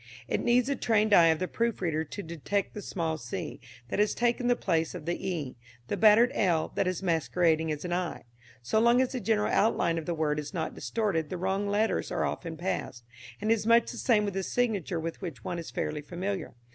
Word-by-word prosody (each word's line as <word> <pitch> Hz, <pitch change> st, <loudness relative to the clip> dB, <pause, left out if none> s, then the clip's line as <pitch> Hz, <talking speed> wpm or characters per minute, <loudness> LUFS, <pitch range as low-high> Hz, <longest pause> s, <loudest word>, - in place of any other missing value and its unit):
It -, -, 0 dB
needs 240 Hz, 0 st, +3 dB
the 280 Hz, +1 st, 0 dB
trained 215 Hz, -4 st, +2 dB
eye 170 Hz, -3 st, +8 dB
of 160 Hz, -1 st, +3 dB
the 185 Hz, -, -2 dB
proof 230 Hz, +2 st, -1 dB
reader 160 Hz, -4 st, 0 dB
to 200 Hz, +6 st, -7 dB
detect 170 Hz, +5 st, -2 dB
the 210 Hz, -, -6 dB
small 165 Hz, -5 st, -2 dB
c 175 Hz, -6 st, -5 dB, 0.3 s
that -, -, -2 dB
has 210 Hz, 0 st, +2 dB
taken 240 Hz, +1 st, +1 dB
the 245 Hz, -, +4 dB
place 165 Hz, -6 st, 0 dB
of 165 Hz, -4 st, -7 dB
the 170 Hz, -, 0 dB, 0.2 s
e, 150 Hz, -8 st, -4 dB, 0.3 s
the -, -, 0 dB
battered 225 Hz, +3 st, +6 dB
l 170 Hz, -5 st, +1 dB
that -, -, 0 dB
is 185 Hz, 0 st, -2 dB
masquerading 160 Hz, -1 st, +1 dB
as 150 Hz, +3 st, -4 dB
an 175 Hz, -, -2 dB
i. 180 Hz, -1 st, -2 dB, 0.4 s
So 220 Hz, -, +1 dB
long 235 Hz, +2 st, +5 dB
as 260 Hz, -1 st, +2 dB
the 255 Hz, -, -3 dB
general 210 Hz, -1 st, +1 dB
outline 170 Hz, -6 st, +2 dB
of 155 Hz, -, -9 dB
the 170 Hz, -, -1 dB
word 150 Hz, -1 st, 0 dB
is 150 Hz, +5 st, -7 dB
not 160 Hz, -, -2 dB
distorted 195 Hz, -9 st, -1 dB
the 185 Hz, -, -4 dB
wrong 190 Hz, +3 st, -1 dB
letters 210 Hz, +2 st, 0 dB
are -, -, 0 dB
often 165 Hz, -2 st, -4 dB
passed; 170 Hz, -9 st, -3 dB, 0.4 s
and 215 Hz, +2 st, 0 dB
it -, -, +8 dB
is 215 Hz, -1 st, -2 dB
much 230 Hz, 0 st, +4 dB
the -, -, -8 dB
same 215 Hz, -4 st, +3 dB
with 200 Hz, -2 st, -3 dB
a 195 Hz, -, 0 dB
signature 200 Hz, -6 st, -1 dB
with 165 Hz, +3 st, -5 dB
which 155 Hz, -, -6 dB
one 175 Hz, -, -3 dB
is 165 Hz, -, -7 dB
fairly 150 Hz, -, -3 dB
familiar. 180 Hz, 0 st, -4 dB
185 Hz, 230 wpm, -29 LUFS, 165-215 Hz, 0.4 s, eye